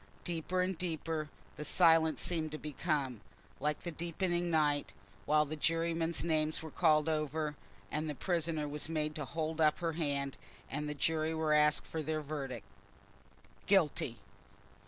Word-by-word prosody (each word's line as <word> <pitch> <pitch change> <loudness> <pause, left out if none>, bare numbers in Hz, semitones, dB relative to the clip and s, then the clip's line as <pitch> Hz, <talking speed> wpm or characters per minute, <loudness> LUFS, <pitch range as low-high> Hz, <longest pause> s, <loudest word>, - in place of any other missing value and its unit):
Deeper 175 +2 -1
and 185 -2 -2
deeper 160 -3 -2 0.3
the 150 - -4
silence 160 0 +5
seemed 160 -3 0
to 155 - -4
become, 145 - -2 0.4
like 150 0 -1
the 175 - -3
deepening 175 +2 -1
night, 150 -3 +2 0.3
while 150 0 +4
the 155 +2 -4
jurymen's 165 +1 +1
names 155 -1 +1
were 160 - -7
called 155 -3 +3
over, 155 -1 -1 0.4
and 155 +1 -1
the 150 - -3
prisoner 165 -2 0
was 150 +1 -2
made 155 -1 -1
to 150 -2 -4
hold 160 +2 -2
up 150 -1 +4
her 165 -1 -1
hand, 140 -4 -1 0.3
and 150 +2 -2
the 150 - -3
jury 160 +2 +1
were 160 -1 +1
asked 150 0 +4
for 160 - -4
their 155 +1 -2
verdict. 140 -3 -5 1.0
"Guilty." 150 - +2
155 Hz, 155 wpm, -34 LUFS, 150-165 Hz, 1.0 s, silence